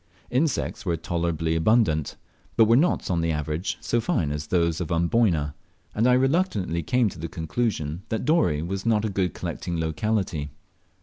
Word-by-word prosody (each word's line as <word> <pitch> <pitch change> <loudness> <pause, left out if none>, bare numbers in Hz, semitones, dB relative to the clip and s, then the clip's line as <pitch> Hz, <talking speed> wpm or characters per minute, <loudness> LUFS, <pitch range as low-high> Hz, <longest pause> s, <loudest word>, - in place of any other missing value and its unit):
Insects 135 +3 0
were 85 -4 0
tolerably 85 -1 -1
abundant, 80 - +2 0.4
but 115 - +7
were 115 +2 +5
not 155 - +2
on 85 -2 +1
the 85 0 0
average 75 +3 -2
so 120 - 0
fine 80 -8 0
as 75 0 -4
those 85 -1 +1
of 85 - -4
Amboyna, 85 -3 +2 0.4
and 115 +3 +2
I 125 - +5
reluctantly 130 - +1
came 125 +8 +2
to 85 - -11
the 85 - -4
conclusion 80 -2 -2
that 110 - -2
Dorey 115 - +2
was 95 +3 -3
not 110 -2 +2
a - - 0
good 95 -3 -1
collecting 85 -2 -4
locality. 80 -2 -1
85 Hz, 170 wpm, -25 LUFS, 80-115 Hz, 0.4 s, but